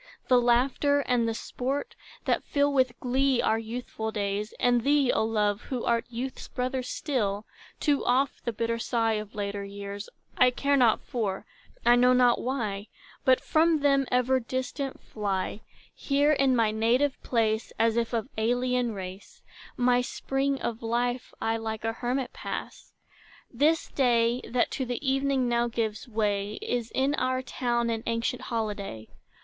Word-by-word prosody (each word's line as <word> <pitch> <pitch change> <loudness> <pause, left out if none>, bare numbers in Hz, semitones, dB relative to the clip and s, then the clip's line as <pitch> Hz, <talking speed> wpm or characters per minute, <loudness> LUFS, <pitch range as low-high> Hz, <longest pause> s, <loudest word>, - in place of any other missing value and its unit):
The 250 -1 +6
laughter 265 +4 +3
and 245 -4 +1
the 225 - -1
sport, 265 +4 -3 0.3
That - - +1
fill 285 0 +1
with 260 -3 +1
glee 260 0 +2
our 220 - +2
youthful 225 -1 -5
days, 205 0 -2
And 245 -1 +3
thee, 280 0 +3
O 220 - +2
love, 210 -1 +1
who 250 -3 -3
art 235 -1 +1
youth's 245 +3 -5
brother 255 +1 -2
still, 225 -6 -2 0.3
Too 290 -3 +1
oft 260 +2 +1
the 235 - -1
bitter 230 +1 -2
sigh 230 -1 +1
of 215 -1 -4
later 200 -1 -3
years, 200 +1 -7 0.3
I 250 - +6
care 280 +3 +1
not 245 -5 +4
for; 205 -6 -3 0.4
I 240 0 +7
know 250 +1 +5
not 250 -1 +4
why, 220 -6 -2 0.4
But 260 -1 +5
from 320 -1 +3
them 275 -2 +3
ever 250 +1 +3
distant 260 +3 -4
fly: 200 -1 -3 0.3
Here 285 +1 +2
in 275 -3 +3
my 225 -3 +3
native 240 +6 +1
place, 220 -2 0
As 225 0 +3
if 235 -1 0
of 230 0 -1
alien 245 0 +1
race, 190 0 -9 0.3
My 245 0 +3
spring 270 +2 -1
of 230 -1 -3
life 245 +2 -1
I 225 0 0
like 220 -1 -4
a 225 - 0
hermit 250 +2 -2
pass. - - -6 0.6
This 300 +6 +2
day, 240 -2 +2
that 240 0 +1
to 265 - -2
the 250 +3 -4
evening 270 -1 +2
now 240 0 +2
gives 225 0 -3
way, 210 -2 -1
Is 240 -2 -2
in 270 +2 +2
our 255 0 0
town 240 -2 -1
an 225 -1 -2
ancient 230 +2 -1
holiday. 205 - -4
240 Hz, 160 wpm, -28 LUFS, 220-260 Hz, 0.6 s, I